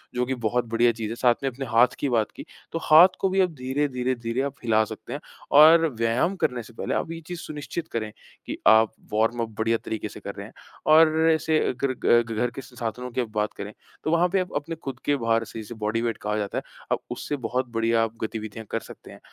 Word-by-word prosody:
जो 125 0 +1
कि 130 +1 -2
बहुत 120 +2 0
बढ़िया 120 +1 +4
चीज़ 115 -2 -5
है, 115 - -4
साथ 120 0 +3
में 135 - +1
अपने 135 +2 -6
हाथ 120 +1 +3
की 140 - 0
बात 115 -3 +1
की, - - -9 0.3
तो 165 - -2
हाथ 160 +4 +8
को 195 - +1
भी 190 +1 +2
आप 185 - +3
धीरे-धीरे, 130 -1 -1
धीरे 120 +1 -2
आप 140 0 -3
हिला 110 -2 +3
सकते - - -8
हैं - - -4 0.4
और 165 +2 +8
व्यायाम 115 +11 +1
करने 125 -9 -1
से 120 - -15
पहले - - -3
आप - - -2
ये 165 - -5
चीज़ 175 -1 -5
सुनिश्चित 155 +2 -6
करें, 110 -2 -3 0.3
कि - - -5
आप 110 0 +6 0.2
वार्म 115 +2 +1
अप 115 - -2
बढ़िया 115 +1 +2
तरीके 110 -1 -3
से - - -10
कर - - -7
रहे - - -7
हैं। - - -17 0.4
और 160 0 +6
ऐसे 160 0 +2
अगर 130 +1 -1
ग 120 -1 +3
घर 125 - +2
के - - -5
साधनों 125 -1 -5
की 125 - -1
आप 120 - -3
बात 105 0 0
करें, 100 +1 -6 0.3
तो 155 - 0
वहाँ 170 +2 +4
पे 195 +2 +1
आप 185 - -3
अपने 150 +3 -3
खुद 135 -5 -7
के 145 - +3
भार 115 -2 +1
से, 115 - -8
जिसे 110 +2 -8
बॉडी 110 +1 -1
वेट 115 -1 -1
कहा 105 0 -1
जाता 105 -1 -3
है, - - -2 0.3
आप - - +2
उससे 145 - -3
बहुत 130 0 -2
बढ़िया 115 0 +2
आप 115 0 -3
गतिविधियाँ 110 0 -5
कर - - 0
सकते - - -13
हैं - - -13
120 Hz, 245 wpm, -25 LUFS, 115-145 Hz, 0.4 s, हाथ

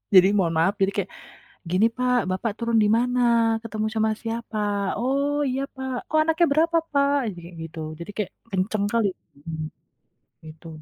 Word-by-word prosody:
jadi 185 0 +9
mohon 170 -4 +2
maaf, 170 +5 +3
jadi 195 +1 +3
kayak, 195 -1 -1 0.6
"Gini 190 +5 +4
Pak, 250 0 +2
Bapak 200 +4 -1
turun 235 -1 0
di 210 - +3
mana? 245 +1 +1 0.4
Ketemu 215 -1 -2
sama 220 0 +2
siapa? 225 -1 -4 0.4
Oh, 280 +3 +1
iya 265 +2 -1
Pak. 265 -1 -4 0.2
Oh 310 - +4
anaknya 325 +2 +3
berapa 330 +3 +3 0.2
Pak?" 280 0 +3 0.2
Jadi 175 - -12
kayak 170 0 -11
gitu, 160 0 -8 0.2
jadi 170 - -7
kayak, 210 -3 -2 0.2
kenceng 200 +2 0
kali, 230 -3 +3 0.3
mhm, 155 +1 -6 0.8
gitu. 155 +2 -12
220 Hz, 165 wpm, -24 LUFS, 185-260 Hz, 0.8 s, jadi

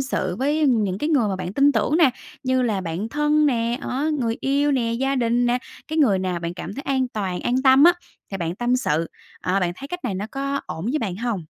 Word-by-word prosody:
sự 185 -9 -2
với 295 +3 +1
những 210 -7 +1
cái 300 - -1
người 260 -9 +2
mà 190 - -2
bạn 185 0 -5
tin 280 +4 +4
tưởng 230 +7 +1
nè, 320 -7 +5 0.3
như 260 -1 +1
là 210 -5 0
bạn 180 +5 -4
thân 295 +2 +2
nè, 235 -1 0
đó, 285 +5 -1
người 230 -3 -1
yêu 280 +2 +1
nè, 235 -3 0
gia 270 +3 0
đình 240 0 +2
nè, 245 +1 +2 0.3
cái 315 +1 -2
người 215 -10 +4
nào 185 -2 -2
bạn 170 0 -4
cảm 200 - -7
thấy 275 - -6
an 260 -3 0
toàn, 190 -6 -3
an 255 +2 0
tâm 265 +2 +6
á, 350 - +8 0.4
thì 195 - -3
bạn 170 -2 -3
tâm 245 +1 +1
sự. 165 - 0 0.3
Ờ, 190 +2 0
bạn 175 -1 0
thấy 275 - -8
cách 355 -3 -6
này 220 -6 -1
nó 200 +3 -3
có 275 0 -2
ổn 160 - -6
với 275 +7 0
bạn 190 -7 -3
hông? 220 -7 -3
245 Hz, 250 wpm, -23 LUFS, 195-275 Hz, 0.4 s, á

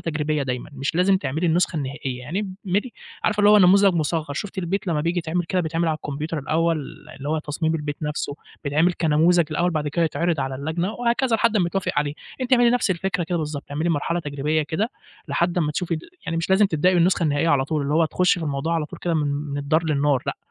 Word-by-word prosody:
تجريبية 150 -2 -1
دايمًا، 125 +2 -4
مش 140 +3 -3
لازم 190 +2 +4
تعملي 165 -1 -2
النسخة 170 +1 +2
النهائية 135 -3 -4
يعني، 185 +9 -4
اعملي 205 +6 0 0.3
عارفة 210 -1 +2
اللي 205 0 +6
هو 210 - +8
نموذج 195 0 +6
مُصغّر، 155 -2 -1
شُفتِ 195 +4 -5
البيت 190 +3 -2
لمّا 160 -4 0
بييجي 170 +3 0
يتعمل 175 +1 -1
كده 185 +2 0
بيتعمل 165 +1 -1
على 155 - 0
الكمبيوتر 150 +2 -4
الأوّل، 160 +2 +1 0.4
اللي 140 +2 -6
هو 155 - +1
تصميم 160 +2 -2
البيت 150 -2 -3
نفْسه، 150 -1 -3 0.3
بيتعمل 155 +5 +2
كنموذج 165 +2 +3
الأوّل 175 +3 +1
بعد 150 -2 -1
كده 165 +3 +1
يتعرض 160 0 0
على 135 0 -2
اللجنة، 160 +8 -2
وهكذا 240 0 +1
لحد 230 0 +2
امّا 180 -4 +2
يتوافق 195 +2 -2
عليه، 145 0 0 0.3
أنتِ 255 0 -2
اعملي 240 -1 +6
نفْس 245 -4 +1
الفكرة 180 0 -1
كده 175 +1 -1
بالضبط، 150 -2 -4
اعملي 155 +4 -1
مرحلة 170 +2 0
تجريبية 150 +1 -1
كده 185 +10 -2 0.4
لحد 175 +1 +1
امّا 150 -3 0
تشوفي 170 +1 -1
ال 155 - -4 0.3
يعني 165 - -2
مش 165 +3 -2
لازم 195 +2 +5
تبدئي 180 +2 +2
بالنسخة 175 0 +3
النهائية 150 +1 +1
على 140 -4 +3
طول، 150 0 -1
اللي 145 +2 -1
هو 165 0 +4
تخشي 180 +2 +2
في 160 - -3
الموضوع 145 +4 -1
على 160 -2 0
طول - - -11
كده 170 -1 -1
من 150 -2 +1
من 145 0 -3
الدار 155 +3 +1
للنار، 145 -3 +1
لأ - - -2
165 Hz, 225 wpm, -23 LUFS, 150-180 Hz, 0.4 s, هو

